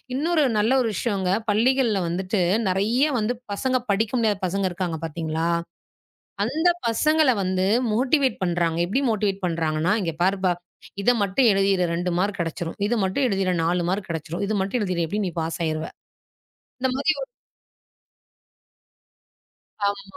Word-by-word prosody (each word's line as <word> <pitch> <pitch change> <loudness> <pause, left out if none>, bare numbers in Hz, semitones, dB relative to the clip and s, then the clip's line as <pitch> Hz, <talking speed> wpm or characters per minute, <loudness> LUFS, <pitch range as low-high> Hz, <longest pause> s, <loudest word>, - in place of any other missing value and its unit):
இன்னொரு 315 +2 +2
நல்ல 215 +4 +2
ஒரு 235 - 0
விஷயங்க. 195 -6 -1 0.2
பள்ளிகள்ல 230 -1 +2
வந்துட்டு, 185 +3 -1 0.3
நெறைய 215 +9 +2
வந்து 220 +3 0 0.2
பசங்க 255 +5 0
படிக்க 215 +2 +1
முடியாத 215 -4 +1
பசங்க 195 +2 -1
இருக்காங்க 175 -2 -3
பாத்தீங்களா? 160 +1 -2 1.0
அந்த 320 +3 +1 0.2
பசங்கள 305 +5 +3
வந்து 185 0 0 0.3
மோட்டிவேட் 265 +2 +2
பண்றாங்க. 170 -2 0
எப்படி 230 +9 0
மோட்டிவேட் 200 -2 -1
பண்றாங்கன்னா, 165 +1 0
இங்க 165 -3 -2
பாருப்பா! 190 -1 +2 0.5
இத 245 - +4
மட்டும் 220 +6 +3
எழுதிடு 195 -2 +2
2 180 +1 -1
மார்க் 200 +2 -1
கெடைச்சுடும். 165 0 -3
இது 240 - +1
மட்டும் 225 +9 +1
எழுதிடு 195 -3 0
4 175 +1 +1
மார்க் 190 +1 -2
கெடைச்சுடும். 165 +4 -3
இது 215 - -1
மட்டும் 195 +6 -1
எழுதிடு, 180 -4 0
எப்படியும் 205 +4 -2
நீ 175 - -7
பாஸ் 160 +1 -3
ஆயிடுவ. 155 0 -2 0.9
இந்த 260 - +1
மாரி 285 +3 +1
ஒரு - - -4 2.6
ஆமா. 200 0 -1
195 Hz, 140 wpm, -24 LUFS, 175-230 Hz, 2.6 s, இத